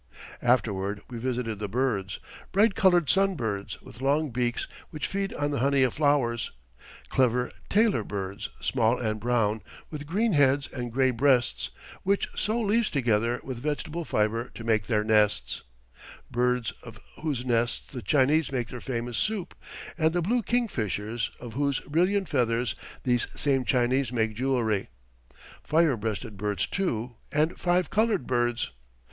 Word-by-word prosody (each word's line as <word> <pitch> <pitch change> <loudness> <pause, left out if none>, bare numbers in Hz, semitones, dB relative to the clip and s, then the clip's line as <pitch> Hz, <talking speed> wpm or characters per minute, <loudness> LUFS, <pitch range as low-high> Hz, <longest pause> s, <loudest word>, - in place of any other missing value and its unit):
Afterward 105 -5 +1
we 120 - -5
visited 120 -3 -2
the 105 - -2
birds. 110 -5 -1 0.3
Bright 205 +2 +4
coloured 180 -6 +4
sun 195 +3 +3
birds, 105 -7 -3
with 120 - -12
long 145 +2 +2
beaks, 120 0 -1 0.2
which 155 - -4
feed 195 0 -2
on 145 0 -1
the 140 - -1
honey 140 +1 +3
of 125 - +2
flowers; 135 -7 +1 0.6
clever 125 -1 +2 0.2
tailor 215 0 +3
birds, 100 +1 -4
small 120 -1 +2
and 110 -2 -2
brown, 110 -2 +1 0.3
with 150 -2 -6
green 210 +6 +1
heads 140 -1 +4
and 120 -3 -4
gray 130 +2 +3
breasts, 125 -1 +2 0.3
which 200 +1 +1
sew 220 +3 0
leaves 225 +1 +2
together 120 -3 +1
with 130 -3 -5
vegetable 155 +3 -2
fiber 115 -2 0
to 115 - -7
make 110 -3 +1
their 105 -3 +2
nests; 105 -1 +2 0.7
birds 125 -1 +1
of 115 -3 -11 0.2
whose 140 -6 -2
nests 120 -1 +1
the 130 -4 -7
Chinese 145 +2 +3
make 125 -4 -2
their 125 - -7
famous 120 -2 -2
soup, 215 -5 -1 0.5
and 160 0 +3
the 175 - +1
blue 235 +7 +2
kingfishers, 115 - -1
of 120 -2 -8
whose 140 0 +1
brilliant 185 +5 +1
feathers 120 -2 +1 0.3
these 120 -2 +2
same 135 -3 +1
Chinese 125 +1 +2
make 110 -3 0
jewelry; 115 -4 0 0.8
fire 160 -3 +3
breasted 110 0 -4
birds, 105 -2 0
too, 120 - -2
and 155 +2 +1
five 180 0 +1
coloured 215 - +2
birds. 120 - 0
125 Hz, 150 wpm, -27 LUFS, 115-155 Hz, 0.8 s, Bright